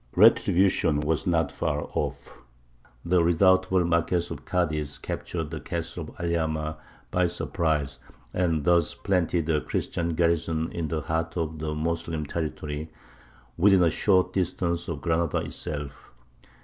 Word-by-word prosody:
Retribution 85 -4 +4
was 75 +3 -1
not 80 -3 +2
far 75 0 -1
off. - - -4 0.7
The 85 0 +3
redoubtable 95 +1 +4
Marquess 85 +1 +1
of - - -7
Cadiz 75 -5 -1
captured 80 -3 -4
the 80 - -4
castle - - -5
of - - -15
Alhama 80 -2 -1 0.3
by 90 0 +2
surprise, 80 -5 -1 0.3
and 85 -4 +1
thus 85 -1 +3
planted 90 -4 0
a 75 -2 +2
Christian 85 -1 -2
garrison 80 -1 +1
in 85 -2 -3
the 80 +1 -2
heart 80 +2 -2
of 80 -2 -2
the 75 0 -3
Moslem 80 0 -2
territory, 75 0 -4 0.7
within 95 0 +6
a 85 - +4
short 95 +1 +2
distance 85 -2 -1
of 75 -4 -4
Granada 85 -1 +1
itself. 70 -2 -5
85 Hz, 135 wpm, -26 LUFS, 80-85 Hz, 0.7 s, within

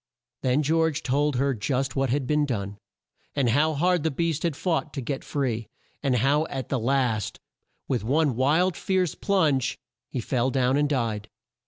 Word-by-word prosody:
Then 130 +4 +2
George 160 0 +1
told 140 +3 +1
her 135 +2 +1
just 130 +4 -1
what 135 -1 +1
had 135 +2 0
been 150 +3 +2
done, 100 -5 -3 0.6
and 135 -4 +2
how 150 +5 +2
hard 175 +3 +2
the 160 - +1
beast 160 +1 -1
had 165 -4 0
fought 165 -2 -1
to - - -2
get 135 +2 -4
free, 120 -6 -2 0.3
and 135 -3 +1
how 140 +6 +2
at 135 -2 -5
the 135 - 0
last, 115 -4 0 0.5
with 125 -5 -1
one 140 +2 +2
wild 160 +8 +2
fierce 185 -4 0
plunge, 155 - +1 0.3
he 130 - -3
fell 125 +2 0
down 130 -1 +2
and 145 0 +2
died. 110 -6 -1
135 Hz, 175 wpm, -26 LUFS, 125-155 Hz, 0.6 s, Then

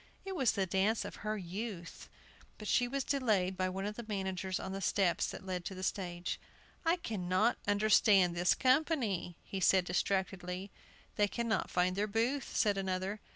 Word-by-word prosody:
It 385 -1 -4
was 265 -8 +3
the 195 - 0
dance 195 +5 +1
of - - -7
her 215 0 -3
youth. 185 -1 -6 0.5
But 215 - -8
she 245 +3 +3
was 275 +2 -2
delayed 215 -10 +1
by 185 0 0
one 190 +1 -3
of 210 +1 -3
the 235 - -6
managers 190 -2 -2
on 190 - -5
the 195 0 -4
steps 190 -2 +2
that 190 - -8
led 180 -2 -3
to 190 - -4
the 185 - -7
stage. 175 -2 -2 0.4
"I 330 +1 +3
cannot 215 - 0
understand 205 -3 +5
this 175 +1 +3
company," 255 - +1
he 195 - -5
said, 185 0 +4
distractedly. 185 +1 -1 0.5
"They 205 - +4
cannot 230 +1 -1
find 180 +1 +1
their 205 +2 0
booth," 235 +6 -1
said 205 -3 +3
another. 190 +2 -2
195 Hz, 175 wpm, -33 LUFS, 185-220 Hz, 0.5 s, understand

